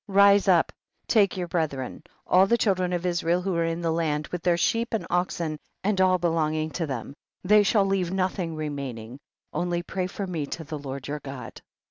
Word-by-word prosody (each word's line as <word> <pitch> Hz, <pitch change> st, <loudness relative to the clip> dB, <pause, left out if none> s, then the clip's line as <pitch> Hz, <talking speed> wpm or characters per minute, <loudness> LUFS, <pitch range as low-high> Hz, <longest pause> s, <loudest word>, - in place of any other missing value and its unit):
Rise 200 Hz, 0 st, +5 dB
up 175 Hz, -4 st, +4 dB
and -, -, -46 dB
take 200 Hz, -5 st, +3 dB
your 180 Hz, -1 st, -2 dB
bre 165 Hz, -2 st, +1 dB
thren, 135 Hz, +1 st, -7 dB, 0.2 s
all 185 Hz, +2 st, +5 dB
the 235 Hz, -, +3 dB
children 185 Hz, -5 st, +1 dB
of 175 Hz, 0 st, -2 dB
Israel 175 Hz, 0 st, +1 dB
who 195 Hz, 0 st, -1 dB
are 170 Hz, -, +2 dB
in 165 Hz, +1 st, -2 dB
the 165 Hz, -1 st, 0 dB
land, 155 Hz, -2 st, 0 dB
with 180 Hz, -, -4 dB
their 175 Hz, 0 st, +2 dB
sheep 230 Hz, +5 st, +1 dB
and 220 Hz, -, -3 dB
oxen, 175 Hz, -3 st, -1 dB, 0.2 s
and 195 Hz, -1 st, +1 dB
all 185 Hz, -1 st, +4 dB
belonging 160 Hz, -2 st, 0 dB
to 165 Hz, +2 st, -2 dB
them, 135 Hz, -1 st, -5 dB, 0.3 s
they 210 Hz, +3 st, +6 dB
shall 205 Hz, 0 st, +3 dB
leave 190 Hz, -3 st, 0 dB
nothing 185 Hz, -3 st, -1 dB
remaining, 135 Hz, -6 st, -5 dB, 0.3 s
only 175 Hz, 0 st, -1 dB
pray 185 Hz, 0 st, -3 dB
for 195 Hz, +2 st, -5 dB
me 165 Hz, -6 st, -3 dB
to 160 Hz, -, -5 dB
the 155 Hz, 0 st, -6 dB
Lord 135 Hz, -1 st, -6 dB
your 150 Hz, +1 st, -3 dB
God. 135 Hz, -4 st, -8 dB
175 Hz, 205 wpm, -26 LUFS, 155-190 Hz, 0.3 s, they